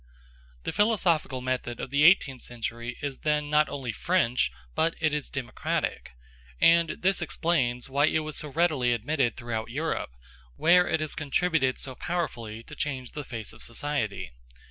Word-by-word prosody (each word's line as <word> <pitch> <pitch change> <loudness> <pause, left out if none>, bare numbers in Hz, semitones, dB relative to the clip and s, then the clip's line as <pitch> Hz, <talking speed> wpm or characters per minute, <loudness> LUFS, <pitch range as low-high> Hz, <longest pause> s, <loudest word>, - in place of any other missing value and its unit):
The - - -2
philosophical 180 - +2
method 125 -2 -2
of 130 - -5
the 140 +1 +3
eighteenth 140 -8 +5
century 120 0 -5
is 140 -2 -3
then 150 -1 0
not 150 -1 +4
only 130 -4 -3
French, 125 - +1 0.2
but 165 - +1
it 155 -2 +1
is 150 -2 -2
democratic; 135 -4 -2 0.5
and 170 0 +6
this 190 +1 +2
explains 130 -8 0
why 140 +2 +3
it 155 - +1
was 155 - -4
so 150 - -3
readily 145 -6 +2
admitted 120 +1 0
throughout 115 -2 -4
Europe, 155 +7 -2 0.5
where 175 - +5
it 160 - 0
has 155 - -2
contributed 145 -2 +1
so 130 - -4
powerfully 120 -9 -3
to - - -12
change 130 -4 -3
the 150 - -5
face 115 -5 -5
of 115 - -13
society. 115 - -2
140 Hz, 160 wpm, -27 LUFS, 120-160 Hz, 0.5 s, and